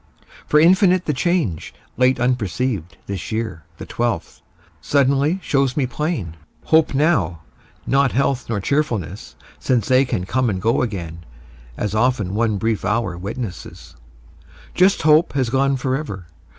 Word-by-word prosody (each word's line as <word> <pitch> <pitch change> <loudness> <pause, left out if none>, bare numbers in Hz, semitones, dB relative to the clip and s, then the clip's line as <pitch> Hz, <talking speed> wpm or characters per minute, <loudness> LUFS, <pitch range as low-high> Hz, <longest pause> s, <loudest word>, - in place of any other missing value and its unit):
For 150 - +4
infinite 180 +2 +4
The 150 - 0
change, 130 - -1 0.2
late 130 0 +2
unperceived, 120 -5 -1
this 100 +2 -5
year, 110 -8 -4
The - - -8
twelfth, 120 -1 -3 0.4
suddenly, 140 - +2
shows 135 -1 0
me 140 - +2
plain. 130 - -3 0.3
Hope 160 -3 +3
now, 100 - +1 0.4
not 135 0 +2
health 135 -2 0
nor 110 -3 -1
cheerfulness, 105 - -2 0.2
Since 125 -4 0
they 130 +1 +5
can 90 -7 -2
come 130 +3 0
and 95 -3 -2
go 115 +5 +1
again, 85 -8 -5 0.5
As 105 -1 -2
often 110 -4 +1
one 110 -1 +1
brief 110 +1 -1
hour 110 -7 -1
witnesses, 100 +2 -7 0.8
Just 185 0 +3
hope 155 +2 +4
has 130 -5 0
gone 135 +1 +2
forever. 130 - -3
125 Hz, 135 wpm, -20 LUFS, 100-140 Hz, 0.8 s, they